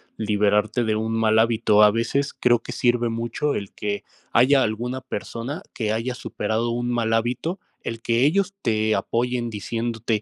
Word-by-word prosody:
liberarte 105 +2 +1
de 110 -1 +1
un 110 +1 -1
mal 110 0 +4
hábito. 110 -2 +3
A 105 - +8
veces 120 +6 -1
creo 120 -1 +3
que - - -8
sirve 120 -1 +1
mucho 115 +6 -2
el 100 -1 -5
que 100 -1 -3 0.3
haya 130 +3 +5
alguna 120 +4 -2
persona 125 - -5
que 110 -2 -1
haya 115 +3 -1
superado 110 0 -2
un 120 +1 -2
mal 115 -2 0
hábito. 125 - -1 0.2
El 115 0 -5
que 115 +2 +2
ellos 195 +5 +2
te 110 -2 +1
apoyen 120 +4 -1
diciéndote 115 0 -2
115 Hz, 165 wpm, -23 LUFS, 110-120 Hz, 0.3 s, A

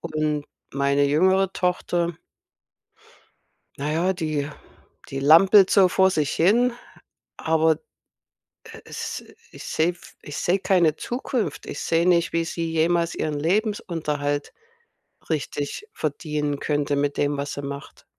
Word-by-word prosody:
Und 155 -2 -2 0.3
meine 140 +1 +2
jüngere 185 +6 +3
Tochter 175 -1 -1 1.6
na 145 +2 -2
ja, 175 +4 +1
die 155 -5 -2 0.6
die 135 - -4
lampelt 185 +7 +7
so 195 -3 +6
vor 190 +1 +3
sich 150 -5 0
hin, 235 +9 +3 0.6
aber, 160 -1 +2 0.9
äh, - - -12
es - - -6 0.3
ich - - -11
sehe 160 +2 +1
f 175 - -17
ich 145 - -8
sehe 185 +3 +1
keine 175 -5 +3
Zukunft. 235 - -3
Ich - - -6
sehe 165 +1 +1
nicht, 170 -2 +3
wie 165 0 +1
sie 165 0 -3
jemals 170 +1 +1
ihren 150 -2 -2
Lebensunterhalt 160 -6 -1 0.8
richtig 150 - -3
verdienen 150 -1 -2
könnte 145 -1 0
mit 140 0 -1
dem, 145 0 0
was 140 0 -3
sie 145 - -5
macht 140 0 -8
160 Hz, 130 wpm, -24 LUFS, 145-180 Hz, 1.6 s, lampelt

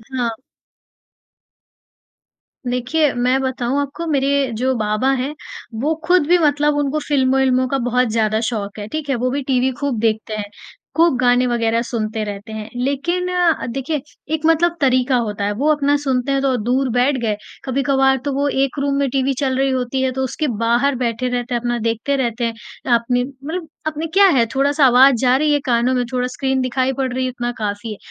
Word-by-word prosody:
हाँ। 245 -2 0 2.4
देखिए, 250 +5 +1
मैं 250 +2 +1
बताऊँ 260 0 -1
आपको, 285 +4 -5
मेरे 280 -3 +1
जो 260 +3 +1
बाबा 215 +4 0
हैं, 285 +3 -4 0.5
वो 305 +4 +1
खुद 355 -4 +3
भी 355 +2 +5
मतलब 295 -2 +2
उनको 290 +1 0
फिल्मों-विल्मों 260 -2 +2
का 275 - -1
बहुत 250 +1 +2
ज़्यादा 215 -1 +1
शौक 210 -3 -5
है। 205 - -6
ठीक 305 +4 -5
है? 275 - +2
वो 250 +1 -1
भी 285 +2 -1
टीवी 260 0 +1
खूब 280 -6 -1
देखते 220 -1 -1
हैं। 205 -1 -5 0.5
खूब 330 -5 +4
गाने 250 0 +3
वगैरह 230 -1 +1
सुनते 220 -2 -2
रहते 205 +1 -7
हैं। 220 0 -6
लेकिन 280 +8 -1
अ, 355 -3 +1
देखिए 270 +4 -3 0.3
एक 315 0 -1
मतलब 335 +1 +3
तरीका 255 -1 +3
होता 205 -1 -3
है। 205 - 0
वो 295 +5 +2
अपना 290 -1 +1
सुनते 265 -1 0
हैं 275 0 +1
तो 270 -2 +1
दूर 250 +4 0
बैठ 250 +3 +2
गए। 220 -3 0 0.3
कभी-कभार 270 0 +2
तो 285 - -1
वो 280 +2 0
एक 275 +1 0
रूम 280 0 0
में 280 -1 +1
टीवी 270 +1 0
चल 265 -2 0
रही 270 0 +2
होती 260 0 -1
है 260 0 +1
तो 265 +1 -2
उसके 295 +4 -2
बाहर 240 +4 +2
बैठे 245 0 -1
रहते 245 0 -3
हैं, 240 - +1
अपना 240 0 -1
देखते 230 +5 -1
रहते 240 -3 -1
हैं। 230 - -1 0.4
अपनी 245 +1 +2
मतलब 285 +6 -6 0.2
अपनी 310 +1 -3
क्या 400 +1 +6
है 265 -10 +3
थोड़ा-सा 280 +2 +3
आवाज़ 260 +2 +7
जा 255 0 +3
रही 300 +2 +1
है 290 - +2
कानों 245 0 +2
में, 250 - +1
थोड़ा 250 -1 0
स्क्रीन 265 +1 -1
दिखाई 255 +1 0
पड़ 260 -1 -2
रही 260 +1 -1
है, - - -1
उतना 240 -1 -3
काफ़ी 210 +1 -4
है। 210 - -7
260 Hz, 195 wpm, -19 LUFS, 240-280 Hz, 2.4 s, आवाज़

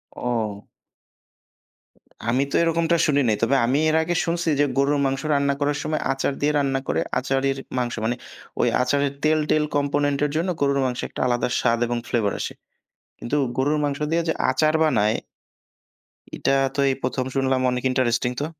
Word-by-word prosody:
ও। 110 -4 -3 1.6
আমি 120 +3 +1
তো - - -1
এরকমটা 165 0 +2
শুনি 145 -2 +2
নাই। 110 - +3
তবে 130 +4 +3
আমি 130 +4 +1
এর 155 - +1
আগে 175 +2 -1
শুনছি 170 0 -1
যে, - - +5
গরুর 140 +1 +2
মাংস 135 0 -1
রান্না 140 0 +2
করার 145 0 0
সময় 155 0 -2
আচার 135 +1 -1
দিয়ে 145 +1 +2
রান্না 135 -2 +1
করে - - 0 0.2
আচারির 135 +1 0 0.2
মাংস, 120 -1 -1
মানে 120 +2 0 0.5
ওই - - +3
আচারের 140 +2 +1
তেল-টেল 155 0 +2
কম্পোনেন্টের 145 0 +1
জন্য 170 +4 0
গরুর 140 -1 +2
মাংস 125 -1 -2
একটা - - -6
আলাদা 120 -1 +1
স্বাদ 115 0 +1
এবং 120 0 -1
ফ্লেভার 110 -5 0
আসে। - - -4 0.7
কিন্তু 120 - -3 0.2
গরুর 145 +3 +1
মাংস 140 -1 -1
দিয়ে 170 +1 +2
যে 160 - +2 0.2
আচার 155 +4 +2
বানায় 110 -8 +2 1.2
এটা - - 0 0.2
তো - - -3
এই 135 - +1
১ম 130 - -1
শুনলাম, 135 -1 +1
অনেক 125 0 -2
ইন্টারেস্টিং 125 -1 +1
তো। 145 - -1
140 Hz, 170 wpm, -23 LUFS, 125-150 Hz, 1.6 s, যে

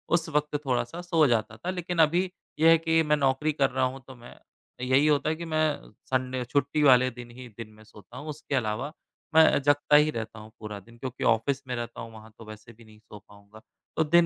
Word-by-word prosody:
उस 165 -1 -1
वक़्त 150 0 -1
थोड़ा-सा 130 +6 -2
सो 165 -3 +2
जाता 110 -2 0
था। 175 - -6
लेकिन 180 -2 -3
अभी 170 +4 +3 0.4
ये 160 - +6
है 165 - +7
कि 165 0 +2
मैं 150 0 +2
नौकरी 140 +2 +1
कर 140 -2 +2
रहा 130 0 -1
हूँ 130 +1 -4
तो 130 - -11
मैं 120 0 -14 0.5
यही 135 +3 +3
होता 150 0 +2
है 160 - 0
कि 170 +1 -7
मैं 155 -1 +1
अ, - - -12 0.2
संडे 130 -1 -1
छुट्टी 140 +4 0
वाले 130 -2 +6
दिन 120 0 -11
ही 125 +1 -11
दिन 115 -2 -8
में 110 0 -17
सोता 110 +3 -15
हूँ, 145 +3 -8
उसके 145 -1 -4
अलावा 120 +4 -2 0.4
मैं 160 -3 +6
जगता 145 +1 +3
ही 150 +1 +6
रहता 110 -2 -6
हूँ 110 +1 -13
पूरा 105 -2 -7
दिन। 115 +4 -18
क्योंकि 130 0 -6
ऑफ़िस 140 +5 -2
में 125 - -3
रहता 120 -1 -6
हूँ, 115 -1 -9
वहाँ 110 0 -14
तो 115 - -12
वैसे 110 +2 -12
भी 115 +1 -18
नहीं 110 0 -18
सो 105 -1 -13
पाऊँगा। 100 +2 -18 0.4
तो 160 - +4
दिन 170 +2 +4
130 Hz, 235 wpm, -27 LUFS, 115-150 Hz, 0.5 s, है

